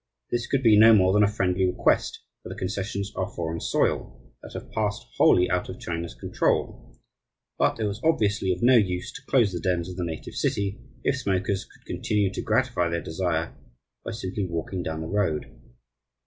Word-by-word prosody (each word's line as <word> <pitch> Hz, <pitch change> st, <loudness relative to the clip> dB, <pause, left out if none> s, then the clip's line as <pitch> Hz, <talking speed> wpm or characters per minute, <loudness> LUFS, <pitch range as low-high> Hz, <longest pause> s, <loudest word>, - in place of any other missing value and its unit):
This 120 Hz, -1 st, -1 dB
could 135 Hz, -1 st, 0 dB
be 110 Hz, -3 st, +6 dB
no 110 Hz, +1 st, +9 dB
more 95 Hz, -2 st, +4 dB
than 105 Hz, -, +4 dB
a 105 Hz, -, +5 dB
friendly 95 Hz, -3 st, 0 dB
request, 90 Hz, -1 st, +1 dB, 0.2 s
for -, -, -9 dB
the -, -, -6 dB
concessions 100 Hz, +1 st, -3 dB
are 95 Hz, +1 st, -2 dB
foreign 85 Hz, -1 st, -3 dB
soil, -, -, -1 dB
that -, -, -11 dB
have -, -, -8 dB
passed 105 Hz, -2 st, -2 dB
wholly 90 Hz, 0 st, +5 dB
out 90 Hz, 0 st, -1 dB
of 95 Hz, -, -7 dB
China's 85 Hz, 0 st, -4 dB
control; -, -, -1 dB, 0.6 s
but -, -, +2 dB
it -, -, -1 dB
was 105 Hz, +2 st, -3 dB
obviously 105 Hz, -, +2 dB
of 90 Hz, +3 st, -2 dB
no 125 Hz, +1 st, +6 dB
use 90 Hz, -4 st, 0 dB
to -, -, -10 dB
close 120 Hz, -7 st, +3 dB
the 90 Hz, -, -3 dB
dens 90 Hz, 0 st, 0 dB
of 90 Hz, 0 st, -8 dB
the 90 Hz, -, -2 dB
native 80 Hz, -2 st, -5 dB
city 100 Hz, +3 st, -1 dB, 0.2 s
if 140 Hz, -, +1 dB
smokers 95 Hz, -2 st, -1 dB
could -, -, -23 dB
continue 100 Hz, -2 st, 0 dB
to -, -, -3 dB
gratify 110 Hz, -6 st, +1 dB
their 85 Hz, 0 st, -2 dB
desire 85 Hz, -1 st, -2 dB, 0.5 s
by -, -, -5 dB
simply 100 Hz, -2 st, -3 dB
walking 85 Hz, +2 st, -3 dB
down 80 Hz, -2 st, -4 dB
the 80 Hz, -, -4 dB
road. 90 Hz, -5 st, 0 dB
95 Hz, 190 wpm, -26 LUFS, 90-105 Hz, 0.6 s, no